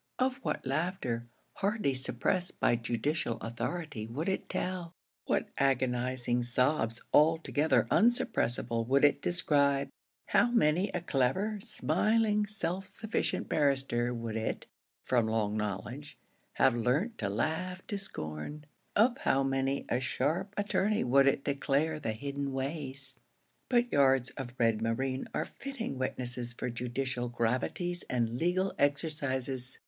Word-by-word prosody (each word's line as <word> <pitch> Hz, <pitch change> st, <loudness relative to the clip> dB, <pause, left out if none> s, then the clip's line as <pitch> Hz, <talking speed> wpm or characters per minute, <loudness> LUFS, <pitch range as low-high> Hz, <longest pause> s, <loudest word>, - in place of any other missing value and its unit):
Of 255 Hz, 0 st, +1 dB
what 270 Hz, -, -3 dB
laughter 135 Hz, -5 st, -1 dB, 0.3 s
hardly 200 Hz, -8 st, +1 dB
suppressed 175 Hz, +7 st, -1 dB
by -, -, +4 dB
judicial 120 Hz, +2 st, -1 dB
authority 120 Hz, +2 st, -4 dB
would 140 Hz, +9 st, -3 dB
it 190 Hz, -, -2 dB
tell 180 Hz, -2 st, -3 dB, 0.3 s
what -, -, 0 dB
agonizing 125 Hz, -2 st, +1 dB
sobs 120 Hz, -1 st, +1 dB
altogether 160 Hz, 0 st, +4 dB
unsuppressable 120 Hz, -, +2 dB
would 140 Hz, +3 st, +5 dB
it 145 Hz, -1 st, +3 dB
describe 140 Hz, -5 st, +2 dB, 0.4 s
how 240 Hz, -, +4 dB
many 185 Hz, -5 st, +3 dB
a 180 Hz, -, -3 dB
clever, 175 Hz, -, 0 dB
smiling, 215 Hz, 0 st, +1 dB
self 195 Hz, -3 st, -3 dB
sufficient 220 Hz, +3 st, -2 dB
barrister 135 Hz, -5 st, +1 dB
would 115 Hz, -2 st, -4 dB
it, 110 Hz, 0 st, -2 dB, 0.4 s
from 120 Hz, -3 st, +2 dB
long 110 Hz, -2 st, 0 dB
knowledge, 110 Hz, +7 st, -4 dB, 0.4 s
have 130 Hz, -, +4 dB
learnt 140 Hz, -, 0 dB
to 100 Hz, -, -1 dB
laugh 160 Hz, -, -2 dB
to 205 Hz, -2 st, -3 dB
scorn 145 Hz, -, -5 dB, 0.3 s
of 240 Hz, +5 st, +4 dB
how 135 Hz, +1 st, +2 dB
many 135 Hz, 0 st, 0 dB
a 120 Hz, -, +1 dB
sharp 155 Hz, +9 st, -1 dB
attorney 205 Hz, 0 st, +1 dB
would 135 Hz, +3 st, +5 dB
it 135 Hz, 0 st, +2 dB
declare 145 Hz, +2 st, 0 dB
the 110 Hz, -6 st, -2 dB
hidden 140 Hz, +3 st, -4 dB
ways! 135 Hz, -1 st, -3 dB, 0.5 s
But 245 Hz, -1 st, +3 dB
yards 135 Hz, -2 st, +4 dB
of 125 Hz, -2 st, -7 dB
red 115 Hz, -2 st, +2 dB
moreen 130 Hz, +4 st, -1 dB
are -, -, -1 dB
fitting 250 Hz, -, -6 dB
witnesses 125 Hz, -2 st, -2 dB
for 125 Hz, +1 st, -3 dB
judicial 125 Hz, +1 st, -2 dB
gravities 125 Hz, +10 st, -1 dB
and 120 Hz, -1 st, 0 dB
legal 185 Hz, +3 st, +1 dB
exercises. 135 Hz, -3 st, -1 dB
135 Hz, 130 wpm, -31 LUFS, 120-175 Hz, 0.5 s, would